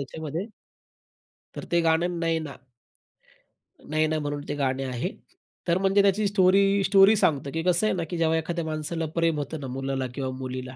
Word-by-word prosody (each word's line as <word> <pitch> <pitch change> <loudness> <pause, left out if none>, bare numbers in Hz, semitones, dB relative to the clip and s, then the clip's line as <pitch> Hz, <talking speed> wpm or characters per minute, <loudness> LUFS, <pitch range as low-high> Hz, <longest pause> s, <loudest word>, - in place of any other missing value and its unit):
त्याच्यामध्ये. 160 +7 -5 1.1
तर - - -7
ते 170 0 +3
गाणं, 170 +2 +1
"नैना." 165 -3 -2 1.3
"नैना" 155 0 +1
म्हणून 145 -1 -3
ते 145 - -3
गाणे 135 -1 -1
आहे. 125 -2 -3 0.6
तर 170 +1 +3
म्हणजे 195 +1 +3
त्याची 200 +1 +2
स्टोरी 195 0 +3
स्टोरी 195 +2 +6
सांगतं, 140 -8 +1
की 165 +2 -3
कसं 180 +3 +2
आहे - - +1
ना 175 - -2
की 175 - -3
जेव्हा 165 -1 +2
एखाद्या 170 +1 -3
माणसाला 160 +1 -3
प्रेम 165 -2 +1
होतं 145 +2 -5
ना 135 - -6
मुलाला 135 0 -3
किंवा 135 -2 -3
मुलीला. 130 0 -6
160 Hz, 165 wpm, -26 LUFS, 140-180 Hz, 1.3 s, स्टोरी